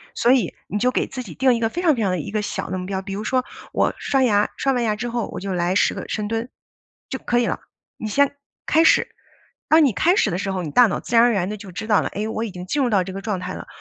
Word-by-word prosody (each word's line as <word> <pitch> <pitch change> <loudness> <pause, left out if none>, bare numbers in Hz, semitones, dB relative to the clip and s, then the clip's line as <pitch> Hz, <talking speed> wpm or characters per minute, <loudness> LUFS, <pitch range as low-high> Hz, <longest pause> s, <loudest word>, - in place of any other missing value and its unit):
所 240 - +3
以 245 -9 +2
你 205 - -2
就 250 +3 +2
给 - - 0
自 255 - -6
己 - - -10
定 260 -1 +4
一 - - -2
个， 225 -1 +1
非 345 - -4
常 325 -5 +4
非 230 - -3
常 195 -3 +1
地 180 - -1
一 155 - -6
个 215 0 0
小 210 - -4
的 185 - -2
目 180 - -5
标， 190 0 -3
比 195 0 -6
如 205 +2 -4
说 255 +3 +1 0.3
我 - - +2
刷 270 -1 +1
牙， 210 -4 +3
刷 275 - +1
完 245 -2 0
牙 215 -2 +1
之 230 +3 -4
后， 235 -2 -2
我 - - -5
就 195 0 -4
来 175 +1 0
10 - - +3
个 - - -6
深 210 -1 -2
蹲， 225 +3 -3 0.6
就 265 - -4
可 240 - +1
以 240 - +2
了。 - - -2 0.4
你 220 - -5
先 280 +6 +2 0.3
开 320 +2 +4
始， 320 - +4 0.6
当 315 +1 +6
你 260 - +2
开 350 - +3
始 215 - +2
的 175 - -1
时 195 +1 -2
候， 185 -1 -2
你 155 - -5
大 245 +9 +6
脑 195 - -2
自 240 - -4
然 230 - +7
而 245 - +4
然 190 -4 0
地 215 - -4
就 195 -2 -10
知 200 +5 -6
道 210 -2 +4
了： - - -2
“哎， 210 +2 -2
我 220 0 -3
已 225 - -4
经 180 -1 -8
进 285 +10 -1
入 250 - +1
到 200 -5 +3
这 190 +1 -7
个 195 - -5
状 205 -3 -2
态 185 +1 -5
了， - - -8
215 Hz, 335 characters per minute, -22 LUFS, 195-245 Hz, 0.6 s, 然